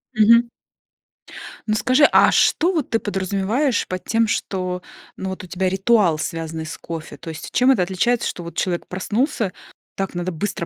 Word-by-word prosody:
Мгм. 235 +2 +5 1.2
Ну 215 - +1
скажи, 255 +6 +4
а - - +6
что 345 +3 +3
вот 315 -7 -1
ты 225 - +1
подразумеваешь 200 +7 -1
под 185 0 -4
тем, 225 0 +2
что, 185 -3 -2 0.4
ну, 190 - -4
вот 190 0 -6
у - - -9
тебя 185 +1 -1
ритуал, 195 -3 +3
связанный 160 0 -4
с 155 - -7
кофе? 160 -3 -7
То 165 - -9
есть 160 0 -7
чем 250 +2 +4
это 230 -9 +3
отличается, 225 +7 0
что 175 - -5
вот 170 - -9
человек 175 -2 -2
проснулся, 215 - -1 0.4
так 195 -1 -3
надо 175 +1 -2
быстро 170 +1 -3
190 Hz, 175 wpm, -21 LUFS, 175-230 Hz, 1.2 s, а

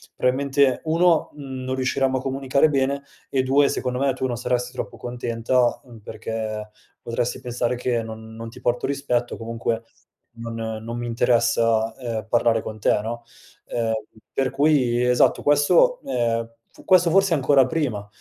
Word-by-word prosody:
probabilmente 135 0 +2
1, 165 +1 +3
uhm, 135 -3 -7
non 130 0 -2
riusciremmo 130 0 0
a - - -3
comunicare 135 +3 +1
bene, 140 0 0 0.3
e 135 - +1
2 135 +2 +3
secondo 125 -1 -2
me 140 0 +2
tu 130 0 -2
non 120 - -2
saresti 125 +1 -2
troppo - - -6
contenta, 120 0 0
uhm, 120 -3 -14
perché 110 0 -5 0.3
potresti 115 +1 -2
pensare 120 0 -2
che 120 -2 -1
non 110 0 -9
non 115 0 -7
ti 115 - -13
porto 120 0 0
rispetto, 135 -4 -1
o - - -11
comunque 115 0 -3 0.5
non 115 0 -7 0.3
non 115 +1 -5
mi 120 0 -4
interessa 115 -1 +2
,ehm, 115 -4 -4
parlare 115 0 +2
con 110 0 -7
te, 105 - +2
no, 115 +2 -5 0.4
ehm, 115 -1 -1 0.4
per 135 -1 0
cui 135 -4 +2
esatto, 125 0 +3
questo, 320 - +4
ehm, 115 -2 0 0.4
questo 180 -2 +5
forse 195 +1 +4
ancora 135 -2 +4
prima, 125 -8 -2
125 Hz, 160 wpm, -23 LUFS, 115-135 Hz, 0.5 s, questo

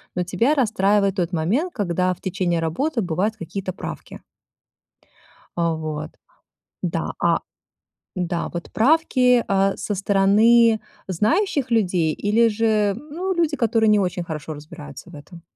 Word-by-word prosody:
Но 180 - 0
тебя 230 - +1
расстраивает 205 -5 +2
тот 180 -2 -2
момент, 225 - 0
когда 185 -3 0
в - - -16
течение 175 -2 -1
работы 230 - -1
бывают 190 +4 -1
какие-то 185 +2 -5
правки. - - -8 1.4
А, 170 -1 +1
вот, 155 0 -5 0.7
да, - - -2
а - - +2 0.8
Да, 175 -1 -2
вот 170 0 -6
правки, 250 -2 +3
а, 195 0 +1
со 210 - -3
стороны 210 +4 +4 0.3
знающих 270 - 0
людей 180 -8 +1
или 225 +3 +2
же, 215 -2 +1
ну, 310 +8 -5
люди, 330 -4 0
которые 225 -2 +2
не 210 -1 +4
очень 180 -2 -1
хорошо 155 -1 -6
разбираются 145 +2 -11
в - - -11
этом? 165 +4 -13
195 Hz, 135 wpm, -22 LUFS, 175-230 Hz, 1.4 s, стороны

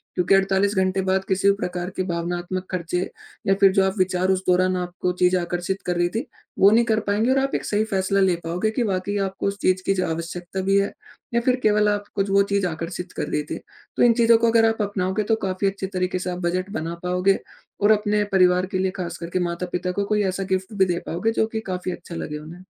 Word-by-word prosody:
क्योंकि 180 +1 +3
48 195 +1 +2
घंटे 190 0 +2
बाद 190 0 +1
किसी 195 +1 +2
भी 200 - +4
प्रकार 180 -2 -3
की 185 - +1
भावनात्मक 175 +2 -3
खर्चे 180 -1 -2 0.5
या 195 - +5
फिर 195 -1 +7
जो 195 -1 +4
आप 190 0 +1
विचार 185 0 +1
उस 190 0 0
दौरान 185 +1 +3
आपको 180 0 -2
चीज़ 180 0 +4
आकर्षित 175 +2 -2
कर 180 - 0
रही 175 0 +2
थी 230 +6 -1 0.3
वो 195 - +8
नहीं 230 +2 +5
कर 220 -2 +2
पाएँगे। 215 +5 +2
और 265 - +3
आप 270 0 -1
एक - - -2
सही 210 +1 +1
फैसला 195 -1 0
ले 185 -2 +3
पाओगे 180 +6 -1
कि 240 +2 0
वाकई 190 +2 -2
आपको 190 +1 -4
उस 200 0 -2
चीज़ 185 0 +2
की 195 - +3
ज 185 - -1
आवश्यकता 175 +3 -4
भी 195 +1 +2
है? 200 - -1 0.4
या 235 - +3
फिर 250 +1 +2
केवल 210 0 +4
आप 205 0 -1
कुछ 195 0 0
वो 200 0 +5
चीज़ 200 -2 +2
आकर्षित 175 +2 -5
कर - - -2
रही 150 - -1
थी। 150 - -5 0.4
तो - - +4
इन 240 -1 +6
चीज़ों 230 -1 +5
को 230 0 +2
अगर 225 0 +5
आप 225 0 -2
अपनाओगे 200 0 -1
तो - - +5
काफ़ी 185 +1 0
अच्छे 195 0 -3
तरीके 185 0 -1
से 180 - -3
आप 180 - -5
बजट 185 +2 -1
बना 165 +2 -4
पाओगे, 180 +2 +2 0.4
और 205 +1 +5
अपने 210 0 +2
परिवार 180 -1 +4
के - - +2
लिए 190 0 +1
खास 170 -1 -5
करके 170 +2 -3
माता-पिता 180 +1 -3
को 200 +2 -1
कोई 210 0 +1
ऐसा 195 - -3
गिफ्ट 190 +2 -2
भी 190 - +5
दे 175 -2 -1
पाओगे 200 +7 0
जो 220 - +2
कि 220 0 -4
काफ़ी 180 0 -3
अच्छा 175 0 -9
लगे 150 -2 -4
उन्हें। 165 +4 -11
190 Hz, 240 wpm, -23 LUFS, 180-200 Hz, 0.5 s, वो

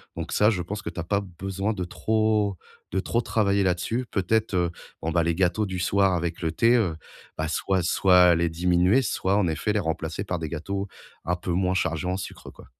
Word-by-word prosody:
Donc - - -5
ça 105 +1 +4
je 95 -5 0
pense 100 +3 -5
que - - -5
tu - - -8
as - - -2
pas 100 +4 0
besoin 95 +3 -3
de 95 -3 -3
trop 110 0 0 0.3
de 95 - 0
trop 115 +4 0
travailler 100 -3 +1
là-dessus. 95 +7 0
Peut-être, 110 +3 0
heu, 90 -2 +1 0.3
bon 80 - -2
ben, 85 0 +2
les 85 -1 0
gâteaux 95 +3 +1
du 95 -2 -4
soir 95 +2 +2
avec 85 0 -2
le 80 -2 0
thé, 115 +8 +3
heu, 95 -10 +1 0.4
bah, 80 0 -1
soit 95 +3 0
soit 90 0 +5
les 85 0 +1
diminuer, 90 +7 +3
soit 100 -4 0
en 95 -4 +2
effet 80 +7 -1
les 105 - +1
remplacer 80 +1 -3
par 90 -3 -3
des 80 -2 -4
gâteaux 100 +5 -4 0.4
un 90 +1 +1
peu 90 0 -5
moins 90 +1 +1
chargés 85 -1 -1
en 90 - -1
sucre, 95 - -8
quoi. - - -15
95 Hz, 220 wpm, -25 LUFS, 85-100 Hz, 0.4 s, soit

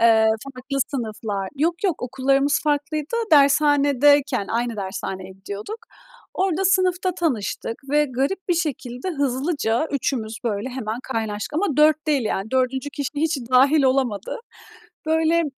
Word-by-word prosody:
Eee, 225 -1 +5 0.3
farklı 270 +2 -4
sınıflar. 215 -6 -3
Yok 335 +6 0
yok, 365 -6 0
okullarımız 270 +3 +1
farklıydı. 300 +5 -1 0.2
Dershanedeyken 285 -4 +4
aynı 235 0 -1
dershaneye 190 -1 -5
gidiyorduk. 200 - -7 0.6
Orada 380 0 0
sınıfta 370 -1 +2
tanıştık 255 - -2 0.2
ve 295 +1 +4
garip 275 +9 -2
bir 350 - +3
şekilde, 280 -3 -3
hızlıca 280 -2 0
3'ümüz 240 -5 -2
böyle 215 +1 -2
hemen 240 -3 -4
kaynaştık 220 -2 -3
ama 360 +7 +1
4 310 0 +4
değil. 285 -5 +1
Yani 210 0 -2
4. 260 +2 0
kişi 285 -2 -4
hiç 315 +2 +1
dâhil 275 +4 +5
olamadı. 255 -6 0 0.7
Böyle, 320 +1 +2
eee, 335 - +2
275 Hz, 130 wpm, -22 LUFS, 235-310 Hz, 0.7 s, Eee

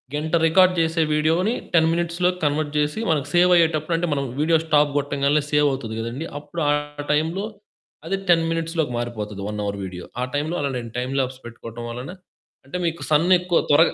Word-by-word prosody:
గంట 155 +3 -1
రికార్డ్ 185 +2 +5
జేసే 165 0 +1
వీడియో‌ని 165 +8 +2 0.2
10 165 -1 +5
మినిట్స్‌లోకి 175 +2 0
కన్వర్ట్ 145 0 0
జేసి 150 +6 0
మనకు 150 -4 0
సేవయ్యేటప్పుడు 170 -2 +4
అంటే, 175 +1 -1
మనం 140 -1 -1 0.2
వీడియో 160 +2 +4
స్టాప్ 150 -2 +3
గొట్టంగాల్నే 145 +1 +1
సేవవుతది 135 -6 +1
గదండీ, 120 +7 -4
అప్పుడు 150 +3 -6
ఆ - - +4 0.4
టైంలో 160 +7 0 0.6
అది 195 +3 0
10 165 -1 +5
మినిట్స్‌లో‌కి 165 -4 -1
మారిపోతది 105 -4 -4
1 105 0 -4
అవర్ 100 0 -3
వీడియో. 90 -1 -7 0.2
ఆ - - +1
టైంలో 155 +4 -1
అలా 140 -1 -1
నేను 115 -2 -6
టైమ్ 125 +2 -2
ల్యాప్స్ 130 0 -2
పెట్టుకోవటం 120 0 -8
వలన 125 +7 -6 0.5
అంటే, 140 +7 -5
మీకు 165 0 -2
సన్ 155 +3 +4
ఎక్కువ 180 -1 0
త్వరగా 160 +3 +5
150 Hz, 170 wpm, -23 LUFS, 135-165 Hz, 0.6 s, రికార్డ్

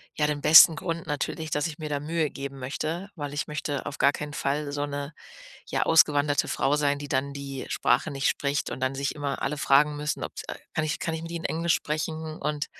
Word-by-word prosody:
ja, 150 - +1
den 145 -1 -2
besten 160 +1 +9
Grund 165 +1 -4
natürlich, 155 +2 -3
dass 150 +3 0
ich 160 0 -8
mir 155 -1 -5
da 145 -1 -1
Mühe 155 0 -1
geben 140 0 -6
möchte, 160 +8 -4
weil 145 -2 -5
ich 145 - -1
möchte 145 -2 -3
auf 145 - -6
gar 140 - +5
keinen 150 0 -6
Fall 145 +1 -1
so 145 0 -2
'ne, 145 +2 -5 0.6
ja, - - +1
ausgewanderte 145 -3 +4
Frau 145 +2 +1
sein, 145 -1 +1
die 145 0 -7
dann 140 +2 -1
die 140 -1 -6
Sprache 160 - +1
nicht 135 -1 0
spricht 140 0 -1
und - - -6
dann 130 +1 0
sich 140 +1 -2
immer 145 -2 -3
alle 150 +2 -1
fragen 145 +2 +3
müssen, 150 +1 -3
ob's - - -6 0.3
„kann 155 - 0
ich 155 - -2
kann 165 - -2
ich 160 - -5
mit 165 - -7
ihnen 170 -1 -2
Englisch 165 +1 +1
sprechen?“ 155 +1 -3
Und 150 0 -1
150 Hz, 225 wpm, -26 LUFS, 140-155 Hz, 0.6 s, besten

